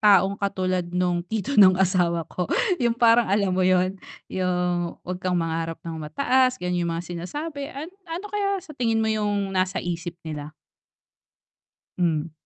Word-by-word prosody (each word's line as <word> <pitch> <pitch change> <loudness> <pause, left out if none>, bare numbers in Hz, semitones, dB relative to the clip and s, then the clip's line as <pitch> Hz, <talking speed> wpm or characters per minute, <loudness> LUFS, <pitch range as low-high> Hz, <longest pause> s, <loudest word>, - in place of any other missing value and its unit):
taong 200 -1 +4
katulad 185 -3 -1
no'ng 180 -1 +1
tito 220 +5 -2
no'ng 185 -2 +8
asawa 175 -3 +2
ko 180 +1 -4 0.3
'yong 235 -1 +2
parang 235 0 +5
alam 200 -1 +2
mo 185 - +1
'yon? 185 +1 +2 0.3
'Yong, 180 -2 0
"Huwag 180 0 -4
kang 185 -1 +1
mangarap 165 0 -2
nang 165 -1 -5
mataas." 255 - +2
Gano'n 180 -4 -1
'yong 170 - -1
mga 170 - -4
sinasabi. 280 - -5
Ano 305 +6 -7 0.2
ano 345 +5 -4
kaya 400 -1 +1
sa 310 - -10
tingin 230 -5 0
mo - - +1
'yong 205 -2 -1
nasa 185 0 0
isip 175 -1 -4
nila? 150 -2 -6 1.5
Hmm. 165 -3 0
185 Hz, 160 wpm, -24 LUFS, 175-225 Hz, 1.5 s, no'ng